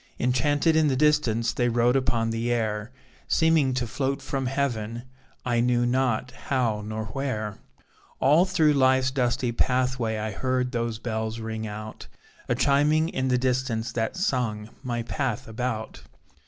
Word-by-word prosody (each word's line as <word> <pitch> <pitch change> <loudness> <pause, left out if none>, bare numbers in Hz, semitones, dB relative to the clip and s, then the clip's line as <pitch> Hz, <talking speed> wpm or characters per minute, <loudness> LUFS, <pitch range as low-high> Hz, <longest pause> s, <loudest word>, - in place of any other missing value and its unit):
Enchanted 145 +6 +2
in 160 -1 +4
the 135 - +1
distance, 125 -6 +2
They 120 0 +1
rode 120 +2 +2
upon 115 -4 +1
the 115 +1 -1
air, 110 -1 -1 0.4
Seeming 160 -5 +3
to 125 -1 0
float 135 +4 -2
from 135 -1 -3
Heaven; 120 -4 -2 0.4
I 120 -2 +1
knew 120 0 +2
not 125 -1 0
how 125 -5 -1
nor 110 +1 -4
where. 110 -3 -3 0.6
All 150 +7 +5
through 160 -6 +3
life's 130 -1 +3
dusty 125 -1 0
pathway, 125 -2 0
I 110 0 -3
heard 125 +3 -1
those 115 -2 -2
bells 110 -1 -3
ring 110 0 -4
out, 110 +1 -8 0.4
A 125 - +2
chiming 145 +4 +3
in 130 -4 -1
the 125 -1 +2
distance, 125 -2 -1
That 115 +3 -2
sung, 115 - -1
my 120 -3 -3
path 130 -1 -3
about. 115 0 -4
125 Hz, 150 wpm, -26 LUFS, 115-135 Hz, 0.6 s, All